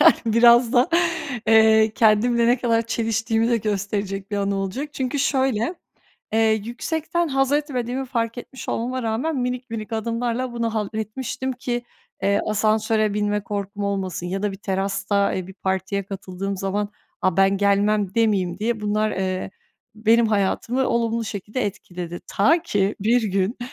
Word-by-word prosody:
yani - - +8
biraz 235 +1 +6
da, 250 0 +4 0.6
eee, 220 -1 +5
kendimle 235 +2 +3
ne 245 +2 +4
kadar 230 -2 +2
çeliştiğimi 225 0 0
de 235 - +4
gösterecek 200 -1 -3
bir 205 - -1
anı 200 0 0
olacak. 195 +10 -3
Çünkü 265 +1 -2
şöyle, 265 - +1 0.6
eee, 225 0 +3
yüksekten 320 +7 -2
hazetmediğimi 270 -2 0
fark 230 -2 -2
etmiş 260 +2 -9
olmama 250 +2 -2
rağmen 240 +8 -1
minik 250 -1 -3
minik 225 -1 -5
adımlarla 235 +2 -2
bunu 230 -1 -2
halletmiştim 220 +5 -3
ki, 245 -1 -3 0.4
eee, 200 +1 +2
asansöre 215 0 +1
binme 210 0 0
korkum 200 0 -4
olmasın 190 -3 -2
ya 190 +2 -3
da 205 -1 0
bir - - -7
terasta, 195 +1 0
eee, 185 -1 -3
bir 190 - -11
partiye 190 +1 -2
katıldığım 195 0 -5
zaman, 200 +2 -2 0.3
a, 185 -3 +2
ben 195 0 +4
gelmem 200 0 +2
demeyeyim 195 -6 +1
diye 220 +1 -1
bunlar, 215 +1 0
eee, 185 -1 -2 0.4
benim 225 +2 +3
hayatımı 220 +5 0
olumlu 230 -1 0
şekilde 210 +4 -3
etkiledi. 175 -3 -6
Ta 320 - +3
ki 205 - 0
bir 230 +4 +3
gün 195 +2 0
220 Hz, 145 wpm, -23 LUFS, 200-240 Hz, 0.6 s, yani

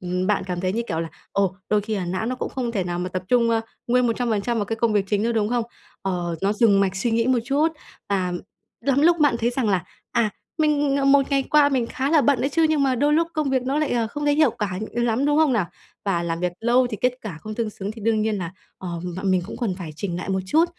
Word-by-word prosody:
ừm, 180 +1 -2
bạn 205 -2 +1
cảm 180 -1 -3
thấy, 185 0 0
như 230 +2 -1
kiểu 165 - -1
là, 165 - -3 0.2
ồ, 195 -1 +1
đôi 210 0 +3
khi 215 +1 -3
là 185 - -2
não 185 +5 -2
nó 255 - -1
cũng - - -3
không 245 -3 -3
thể 195 -5 -1
nào 175 0 -3
mà 180 +1 -2
tập 185 0 -4
trung, 235 -2 +3
ơ, 225 -1 +2 0.3
nguyên 250 0 +3
100% 235 -1 0
vào 205 - 0
cái 225 +2 -3
công 230 -1 +1
việc 205 -2 +2
chính 205 0 +1
nữa, 235 +1 +1
đúng 215 -2 +1
không? 240 -1 0 0.4
Ờ, 175 -3 -2
nó 200 +1 +2
dừng 205 -2 +4
mạch 195 -1 +1
suy 230 +4 0
nghĩ 230 +1 +2
một 260 -2 +3
chút, 285 +5 +2 0.4
à, 185 -3 0 0.5
lắm 275 +2 +2
lúc 335 0 +4
mạn 285 -5 +4
thấy 235 +1 +1
rằng 245 -3 -1
là, 185 -3 +1 0.3
à, 235 -3 +2 0.3
mình, 295 -2 +2
ờ, 275 - +1
một 275 0 +4
ngày 275 -1 +3
qua 295 +1 +4
mình 255 -4 0
khá 270 +4 -2
là 315 -3 +5
bận 280 -3 +3
đấy 275 - +1
chứ 325 0 +3
nhưng 305 -3 +2
mà 265 -2 +2
đôi 290 +4 +2
lúc 330 +2 +3
công 300 -3 0
việc 260 -1 +1
nó 270 +4 0
lại, 305 - 0
ờ, 235 -2 +1
không 295 +6 -5
thấy 290 0 +3
hiệu 310 +1 +4
quả, 190 -4 -3
ừm, 240 +1 0
lắm, 240 +4 +1
đúng 295 +1 +3
không 310 -4 +4
nào? 205 -7 +1 0.4
Và 175 -4 0
làm 165 0 -2
việc 180 -1 0
lâu 245 +2 +3
thì 215 - -3
kết 250 0 +3
cả 185 -8 -7
không 215 0 -6
tương 225 -2 -2
xứng 200 0 -5
thì 225 - -11
đương 220 -1 +2
nhiên 215 -1 0
là, 175 0 -4 0.3
ờ, 185 - -6 0.3
mợ 185 - -5
mình 185 -2 +2
cũng - - -7
cần 220 -7 -1
phải 165 -4 -6
chỉnh 175 -3 -3
nại 180 - -5
một 190 0 0
chút. 320 - +4
230 Hz, 290 wpm, -23 LUFS, 195-265 Hz, 0.5 s, là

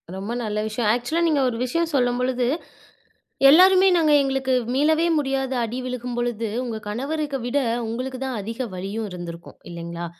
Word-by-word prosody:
ரொம்ப 195 +4 -5
நல்ல 210 -1 -2
விஷயம். 220 0 -1
ஆக்ஸூலா 280 +8 -1
நீங்க 300 -4 +2
ஒரு 230 - -4
விஷயம் 335 +6 -1
சொல்லும்பொழுது, 250 0 +1 1.0
எல்லாருமே 375 +4 +7
நாங்க 310 -2 +3
எங்களுக்கு 270 -1 0 0.2
மீளவே 315 +4 +3
முடியாத 270 -1 -1
அடி 230 +3 -3
விழுகும்பொழுது, 240 -2 -3 0.2
உங்க 230 -3 -4
கணவருக்கு 280 +5 -2
விட 275 +4 +1 0.3
உங்களுக்கு 255 +3 -4
தான் 255 -4 -3
அதிக 225 +5 -7 0.2
வலியும் 200 +4 -4
இருந்திருக்கும், 170 -1 -8
இல்லேங்களா. 170 0 -6
250 Hz, 140 wpm, -23 LUFS, 220-275 Hz, 1.0 s, எல்லாருமே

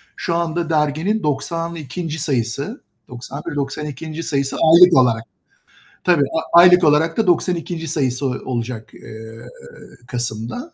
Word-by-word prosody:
Şu 170 - -2
anda 170 0 -2
derginin 160 +8 0
92. 160 +1 -3
sayısı, 140 - -2 0.3
91, 140 +5 -7
92. 150 +3 -5
sayısı 140 -3 -1
aylık 170 0 +6
olarak. 115 -3 +3 0.8
Tabii, 170 -6 +3 0.3
aylık 180 +1 +7
olarak 155 +2 +3
da 220 -4 +1
92. 170 -1 0
sayısı 135 -3 -1
o 130 - 0 0.2
olacak, 115 -2 -5
eee, 110 +2 -11 0.6
kasımda. 120 - -5
150 Hz, 110 wpm, -19 LUFS, 130-170 Hz, 0.8 s, aylık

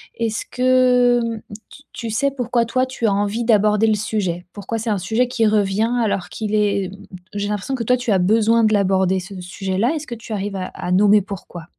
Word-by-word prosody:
Est-ce 225 -2 -2
que 250 -1 +3
hem, 225 -2 -4 0.3
tu 285 - -15
tu 230 -1 -6
sais 275 +6 0
pourquoi 245 -3 0
toi, 255 +3 0
tu 255 -3 -4
as 205 - +3
envie 205 +4 -1
d'aborder 210 -1 +3
le 215 - +3
sujet? 200 -5 -2
Pourquoi 205 +3 -4
c'est 225 - -3
un 205 - +1
sujet 225 +7 0
qui 240 -2 0
revient 210 +1 +1
alors 190 -4 -1
qu'il 215 -1 -4
est 200 -2 +1
e - - -12 0.4
j'ai 205 0 -2
l'impression 210 +6 -2
que 240 - -3
toi, 250 +3 +2
tu 245 -3 -2
as 195 - +4
besoin 225 +4 +3
de 215 -1 +3
l'aborder 190 -2 +2
ce 190 +1 -9
sujet-là, 190 - -1
est-ce 310 -1 -5
que 240 - -5
tu 225 0 -8
arrives 200 -1 -3
à 185 - -3
à 180 - -5
nommer 205 +2 +5
pourquoi? 185 -3 -8
215 Hz, 220 wpm, -20 LUFS, 195-235 Hz, 0.4 s, nommer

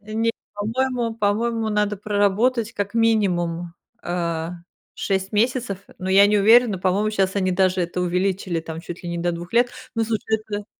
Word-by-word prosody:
нет, 220 +2 -1 0.2
по-моему, 235 +2 -1
по-моему, 225 +2 0
надо 210 -1 0
проработать 210 +4 +1
как 200 0 -3
минимум, 175 -7 +1 0.3
э, 170 -2 -2 0.5
6 190 -1 -2
месяцев, 230 -2 0 0.2
но 185 - -4
я 195 +2 +7
не 210 0 +3
уверена, 220 -1 +5
по-моему, 195 +4 +1
щас 195 -2 0
они 185 -2 +1
даже 185 0 +2
это 175 +1 -3
увеличили 180 -1 -1
там 160 0 -7
чуть 175 0 -8
ли 175 - -5
не 170 - -3
до 175 +1 0
2 170 +1 -7
лет, 240 +1 +3 0.2
но 230 - +1
слушай, 220 0 -1
это 205 -1 -4
205 Hz, 165 wpm, -22 LUFS, 180-225 Hz, 0.5 s, я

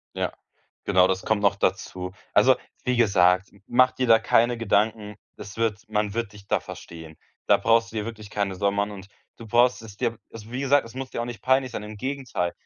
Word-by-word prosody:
Ja. - - -2 0.5
Genau, 95 -2 +4
das 95 0 -1
kommt 110 -1 0
noch 100 - +3
dazu. 90 0 -2 0.2
Also - - +6 0.3
wie 125 -1 +1
gesagt, 95 -4 +3 0.2
mach 130 +1 +4
dir 130 - -1
da 115 -1 +7
keine 115 +2 +2
Gedanken, 105 -1 0 0.2
das 100 +1 -10
wird 110 -1 -2
man 105 -1 -1
wird 115 -1 -3
dich 100 -1 -14
da - - +1
verstehen. 80 -2 -10 0.3
Da - - +6
brauchst 115 0 +2
du 115 - -7
dir 105 - -1
wirklich 110 -2 -8
keine 100 -2 -1
Sorgen 100 +2 0
machen, 100 +1 0
und 100 -1 -10 0.3
du 115 - -11
brauchst 120 +3 +3
es 105 -3 -11
dir 115 -1 -2
also 110 0 -11
wie 125 - -3
gesagt, 140 -1 +3
es 115 - -13
muss 130 0 -6
dir 120 - -3
auch - - -4
nicht 120 -1 -7
peinlich 130 -1 +2
sein. 110 - -5
Im 105 0 -8
Gegenteil: 130 -8 -3
110 Hz, 220 wpm, -25 LUFS, 100-120 Hz, 0.5 s, da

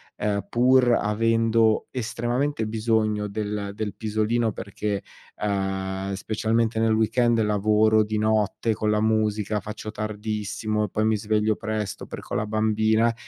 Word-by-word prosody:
ehm, 100 -1 -2
pur 125 +1 +4
avendo 115 0 +2
estremamente 120 +2 -1
bisogno 110 -1 0
del 105 -1 -3
del 105 -2 -3
pisolino 110 +2 0
perché, 100 0 -4 0.4
uhm, 95 -1 -2
specialmente 110 +3 0
nel 110 0 +3
weekend 115 +2 +2
lavoro 110 +1 +3
di 105 0 -2
notte 110 +1 +1
con 105 +1 -1
la 105 - +2
musica, 110 -1 +1
faccio 110 0 -7
tardissimo 105 0 -2
e - - -7
poi 110 +3 0
mi 110 0 +3
sveglio 105 +1 +1
presto, 105 -2 -4
perché - - -8
ho - - +1
la 105 - -1
bambina, 110 +1 +2
110 Hz, 135 wpm, -24 LUFS, 105-110 Hz, 0.4 s, pur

